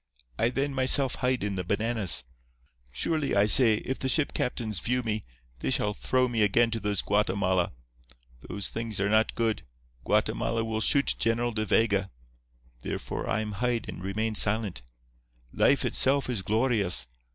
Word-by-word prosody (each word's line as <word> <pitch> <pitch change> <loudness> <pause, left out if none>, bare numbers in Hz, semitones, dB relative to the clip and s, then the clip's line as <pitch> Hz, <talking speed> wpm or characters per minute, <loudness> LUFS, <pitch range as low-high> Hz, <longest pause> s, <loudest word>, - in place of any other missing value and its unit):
I 115 - +2
then 135 +3 -2
myself 130 0 +4
hide 125 -3 0
in 100 -2 -3
the 90 - -2
bananas. 105 - +1 0.7
Surely, 150 - -1
I 100 0 +4
say, 110 +2 +7
if 130 +5 -4
the 130 - -2
ship 150 +1 +1
captains 110 -6 -2
view 125 +8 -1
me, 110 -2 -3 0.3
they - - -2
shall 105 - +1
throw 130 +5 0
me 115 -3 -1
again 115 +3 +3
to 115 - -2
those 105 -2 -1
Guatemala. 95 -3 0 0.8
Those 100 -2 -3
things 115 -3 -4
are 100 +1 0
not 110 +1 +2
good. 115 -3 -1 0.4
Guatemala 115 - 0
will 110 -1 -3
shoot 140 +4 +2
General 120 +1 0
De 110 -1 -3
Vega. 100 -2 +1 0.7
Therefore, - - -5
I 110 - 0
am 105 -1 -5
hide 120 +3 -2
and - - -8
remain 110 +3 -2
silent. 105 - 0 0.7
Life - - +2
itself 135 -1 +1
is 110 -6 -2
glorious. 105 - +2
110 Hz, 160 wpm, -27 LUFS, 100-120 Hz, 0.8 s, say